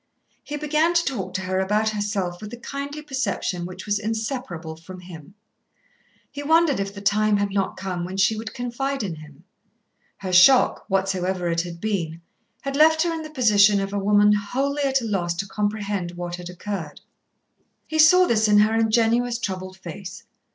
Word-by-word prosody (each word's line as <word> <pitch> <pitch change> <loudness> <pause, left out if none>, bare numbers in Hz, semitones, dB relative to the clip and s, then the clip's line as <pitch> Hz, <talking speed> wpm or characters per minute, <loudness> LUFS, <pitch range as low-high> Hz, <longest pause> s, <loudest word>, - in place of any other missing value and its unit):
He 295 - -5
began 305 +3 +1
to 340 - +3
talk 190 -9 -3
to 190 - -1
her 185 0 -1
about 210 +3 +1
herself 205 -4 -3
with 210 - -7
the 240 - -8
kindly 280 +4 -6
perception 205 - -2
which 185 +1 -9
was 205 -1 0
inseparable 220 - -4
from 180 +3 -11
him. 175 0 -12 1.0
He 285 - -6
wondered 320 -3 +3
if 195 0 -2
the 200 - -8
time 210 +1 +3
had 200 0 -1
not 195 -1 -1
come 185 -2 -4
when 185 +2 -5
she 195 +3 +3
would 220 +1 -6
confide 245 +2 -3
in 175 -5 -4
him. 150 +1 -14 0.7
Her 185 -2 -5
shock, 250 +9 +6
whatsoever 190 -2 -1
it 170 0 +1
had 170 -1 -8
been, 170 -6 -2 0.4
had 275 0 -4
left 315 +2 +5
her 340 -1 -1
in 325 - -4
the 310 - -8
position 210 -7 +4
of 195 0 -3
a 205 - 0
woman 205 +1 +4
wholly 270 +8 -1
at 270 -1 +1
a - - -4
loss 175 -5 -1
to 185 +3 -3
comprehend 205 -3 -2
what 175 0 -5
had 175 0 -8
occurred. 180 -3 -6 0.8
He 315 - -3
saw 360 +4 +7
this 220 -7 +2
in 210 0 +5
her 210 +1 +4
ingenuous 230 +2 +2
troubled 185 -4 -5
face. 190 +2 -9
205 Hz, 185 wpm, -23 LUFS, 185-245 Hz, 1.0 s, saw